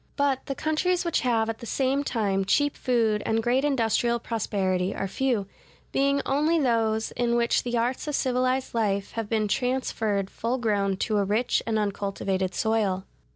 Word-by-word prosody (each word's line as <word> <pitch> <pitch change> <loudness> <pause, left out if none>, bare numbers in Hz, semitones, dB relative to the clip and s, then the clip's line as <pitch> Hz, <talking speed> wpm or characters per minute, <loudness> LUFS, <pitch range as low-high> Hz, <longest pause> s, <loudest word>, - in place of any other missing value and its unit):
But 280 -2 0
the 275 - -3
countries 345 +5 0
which 340 - +1
have 230 -3 +1
at 225 0 -4
the 235 - -8
same 270 +3 +1
time 205 -7 0
cheap 290 +9 +2
food 225 -4 +1
and 225 0 0
great 250 +3 +2
industrial 235 -3 +1
prosperity 195 -5 -1
are 195 - -2
few, 240 -1 0 0.5
being 280 +1 +2
only 300 +5 +2
those 225 -4 +1
in 240 -1 0
which 235 0 +2
the 240 -1 -2
arts 245 +5 -1
of 295 - -1
civilized 255 0 0
life 200 -4 0
have 225 -2 -4
been 215 -2 +1
transferred 220 -5 -1
full 235 +3 -2
grown 200 -5 0
to 215 -2 +1
a - - +2
rich 215 +5 +1
and 225 -1 +1
uncultivated 195 -2 -2
soil. 210 -4 0
230 Hz, 170 wpm, -26 LUFS, 205-260 Hz, 0.5 s, cheap